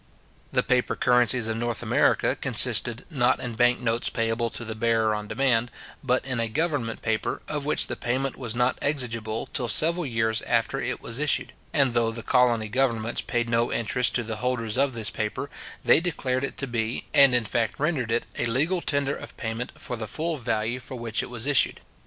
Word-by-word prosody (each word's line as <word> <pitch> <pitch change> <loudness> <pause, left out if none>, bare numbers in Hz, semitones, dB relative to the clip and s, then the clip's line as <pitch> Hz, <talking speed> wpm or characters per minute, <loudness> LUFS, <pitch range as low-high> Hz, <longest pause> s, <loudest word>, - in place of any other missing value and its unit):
The - - +2
paper 125 -1 +1
currencies 125 -2 +3
of 110 0 -2
North 120 -1 -2
America - - +2
consisted, 120 +1 +3
not 130 -4 +2
in 120 -2 -5
bank 120 +1 +3
notes 115 0 0
payable 115 0 -1
to 115 - -4
the 110 - -3
bearer 110 0 +1
on 105 0 -4
demand, 120 +1 +1 0.3
but 130 -1 +1
in 130 -3 -2
a 115 - 0
government 145 -3 -2
paper, 110 -1 -2
of 145 -2 -3
which - - +2
the - - -4
payment 130 +2 -2
was 120 -4 -4
not 125 +1 +1
exigible 115 -6 -1
till 125 - -1
several 165 +7 +5
years 110 -2 0
after - - 0
it - - -3
was 115 +3 -2
issued; 150 -1 +1 0.2
and 135 -5 +2
though 115 -1 +2
the 115 0 -6
colony 120 -4 +2
governments 115 -1 0
paid 120 -1 -2
no 115 0 +1
interest 120 +2 +1
to 120 - +1
the 110 -1 -4
holders 120 -2 -1
of 135 0 +2
this 110 -2 0
paper, 110 +6 -4 0.3
they - - +5
declared 140 -7 -2
it 140 - -4
to 140 - -2
be, 120 -2 -3
and 140 -3 +6
in 120 -2 +2
fact 115 +2 -2
rendered 140 -6 -1
it, 115 - 0
a - - +1
legal 155 +10 0
tender 140 -2 +1
of - - -10
payment 115 +1 -4
for 120 - -5
the 110 -2 -5
full 160 +7 -3
value 120 -2 -2
for 130 - -8
which 115 -2 -1
it - - -7
was 120 -1 -2
issued. 145 -3 +3
120 Hz, 200 wpm, -25 LUFS, 115-135 Hz, 0.3 s, and